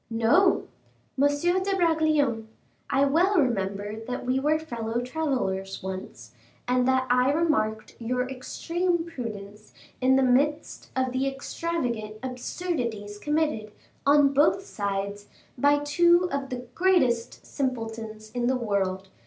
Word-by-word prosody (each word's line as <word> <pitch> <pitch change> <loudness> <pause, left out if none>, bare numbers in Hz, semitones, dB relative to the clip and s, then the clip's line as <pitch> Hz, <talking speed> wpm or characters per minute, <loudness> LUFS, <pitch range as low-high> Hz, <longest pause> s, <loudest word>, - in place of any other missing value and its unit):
"No! 235 - +3 0.5
M. 285 - +6
de 355 +7 +1
Bragelonne, 310 -9 +2 0.4
I 275 +1 +3
well 350 +8 +3
remember 205 -4 -1
that 250 0 -4
we 255 +1 +1
were 300 +3 +2
fellow 235 -7 -3
travelers 245 -10 -2
once, 190 0 -7 0.3
and 250 0 +2
that 260 0 +3
I 250 +2 +4
remarked 220 -9 0
your 250 +2 -1
extreme 335 +6 -2
prudence 215 -8 -8 0.3
in 260 +1 +4
the 265 - +4
midst 285 +5 +1
of 260 -1 0
the 260 +2 0
extravagant 270 -6 -3
absurdities 250 - -4
committed, 295 -7 -1 0.3
on 285 0 +5
both 310 +7 +3
sides, 200 - -3 0.3
by 285 +3 +4
two 345 +4 +4
of 275 -1 -3
the 250 -1 -5
greatest 255 -11 +1
simpletons 225 -5 -4
in 240 -1 -1
the 260 0 +2
world, 195 -5 -1
M. 190 - -26
255 Hz, 130 wpm, -26 LUFS, 220-300 Hz, 0.5 s, M